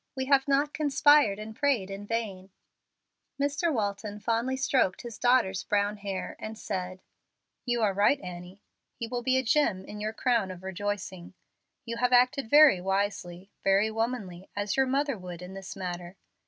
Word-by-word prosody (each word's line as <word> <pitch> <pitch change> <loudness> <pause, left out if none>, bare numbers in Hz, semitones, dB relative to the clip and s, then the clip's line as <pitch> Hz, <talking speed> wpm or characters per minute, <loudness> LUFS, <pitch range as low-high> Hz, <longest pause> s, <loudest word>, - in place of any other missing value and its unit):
We 265 -1 -2
have 270 0 +3
not 280 +1 +2
conspired 290 -6 +4
and 215 +1 -8
prayed 245 -10 0
in 200 +1 -7
vain." 205 -5 -3 0.9
Mr. 290 +4 0
Walton 205 -3 -3
fondly 230 +4 -1
stroked 255 -8 +1
his 235 -3 -8
daughter's 245 -7 +2
brown 205 0 0
hair, 200 -2 -5
and 220 0 -7
said, 185 -2 -5 0.6
"You 240 -2 +1
are 200 -2 +2
right, 205 +8 +3
Annie; 180 +1 -9 0.3
he 230 - -5
will 245 +1 -3
be 260 +1 +2
a 260 - +1
gem 225 -7 +1
in 210 - -8
your 215 +1 -2
crown 230 -3 +1
of 185 0 -9
rejoicing. 190 -1 -5 0.5
You 230 -1 -4
have 250 +1 +1
acted 250 0 +3
very 290 -10 +7
wisely, 195 -1 -2
very 195 +3 +3
womanly, 220 -6 -3
as 205 0 -1
your 265 0 +3
mother 275 -3 0
would, 180 -1 -8
in 180 +1 -9
this 195 -1 -8
matter. 180 0 -6
210 Hz, 170 wpm, -28 LUFS, 190-255 Hz, 0.9 s, very